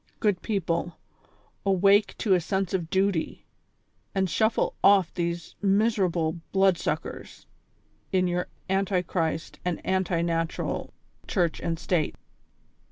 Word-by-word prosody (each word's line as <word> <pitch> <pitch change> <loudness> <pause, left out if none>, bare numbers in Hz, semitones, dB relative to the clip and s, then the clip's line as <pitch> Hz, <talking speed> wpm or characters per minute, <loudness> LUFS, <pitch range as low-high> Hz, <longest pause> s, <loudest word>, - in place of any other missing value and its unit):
Good 205 -5 +1
people, 175 -5 -1 0.7
awake 195 +1 +3
to 205 - +2
a 180 - +3
sense 190 +1 -1
of 175 -4 -1
duty, 190 -3 0 0.7
and 190 -1 +2
shuffle 220 +6 +1
off 195 -4 +5
these 170 -1 -3
miseral)le 195 -6 +2
blood 190 -3 +3
suckers - - -4 0.7
in 185 -1 +3
your 180 0 -1 0.2
anti 190 -1 +1
Christ 160 -2 -2
and 180 -2 -1
anti 185 -3 +1
natural 165 -1 -2 0.4
church 175 -4 0
and 165 -1 -2
state. 170 -2 0
185 Hz, 115 wpm, -27 LUFS, 170-195 Hz, 0.7 s, off